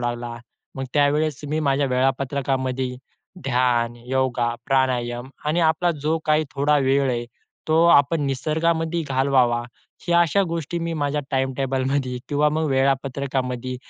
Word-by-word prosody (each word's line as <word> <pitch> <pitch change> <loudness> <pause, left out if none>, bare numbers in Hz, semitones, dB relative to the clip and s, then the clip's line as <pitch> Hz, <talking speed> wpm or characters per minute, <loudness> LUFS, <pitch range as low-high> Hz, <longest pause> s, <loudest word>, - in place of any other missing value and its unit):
लागला, 120 0 -3 0.4
मग 135 - -3
त्यावेळेस 145 0 +2
मी 155 +1 -1
माझ्या 140 -1 +1
वेळापत्रकामध्ये 130 0 -1 0.5
ध्यान, 120 -2 +1
योगा, 125 -2 0
प्राणायाम 125 -2 0 0.2
आणि 165 +3 +1
आपला 165 +2 +2
जो 160 +2 +1
काही 155 0 +2
थोडा 145 +2 +2
वेळ 135 0 +2
आहे 120 -1 -2 0.4
तो 160 +1 +4
आपण 155 -1 +4
निसर्गामध्ये 160 +4 0
घालवावा 130 -3 +2 0.4
ह्या 170 0 +4
अशा 170 +4 +3
गोष्टी 165 0 -3
मी 170 0 -3
माझ्या 145 -1 -1
टाईमटेबलमध्ये 135 -1 -1
किंवा 150 +1 +2
मग 155 +1 -1
वेळापत्रकामध्ये 130 -2 -1
135 Hz, 125 wpm, -23 LUFS, 130-150 Hz, 0.5 s, तो